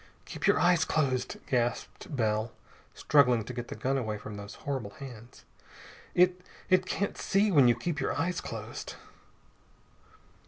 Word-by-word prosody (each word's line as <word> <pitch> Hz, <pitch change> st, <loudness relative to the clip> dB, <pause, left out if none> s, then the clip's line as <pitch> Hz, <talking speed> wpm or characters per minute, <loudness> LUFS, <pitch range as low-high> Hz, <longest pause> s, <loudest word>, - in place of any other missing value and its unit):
"Keep -, -, -3 dB
your -, -, +4 dB
eyes 175 Hz, -2 st, +4 dB
closed," 130 Hz, -5 st, 0 dB
gasped 125 Hz, -, -2 dB
Bell, 110 Hz, -2 st, 0 dB, 0.4 s
struggling 125 Hz, -6 st, +4 dB
to 125 Hz, -, -6 dB
get 120 Hz, -1 st, -5 dB
the -, -, -6 dB
gun 135 Hz, +1 st, 0 dB
away 110 Hz, -4 st, -3 dB
from 105 Hz, 0 st, -8 dB
those 100 Hz, 0 st, -8 dB
horrible 125 Hz, -8 st, -4 dB
hands. 120 Hz, -3 st, -11 dB, 0.7 s
"It 180 Hz, 0 st, +4 dB, 0.3 s
it 185 Hz, 0 st, +4 dB
can't 200 Hz, -, -2 dB
see 205 Hz, +1 st, +2 dB
when 140 Hz, -7 st, +6 dB
you 120 Hz, -, +5 dB
keep 150 Hz, +5 st, -3 dB
your 135 Hz, -, 0 dB
eyes 180 Hz, +3 st, -1 dB
closed!" -, -, -7 dB
130 Hz, 150 wpm, -29 LUFS, 115-170 Hz, 0.7 s, when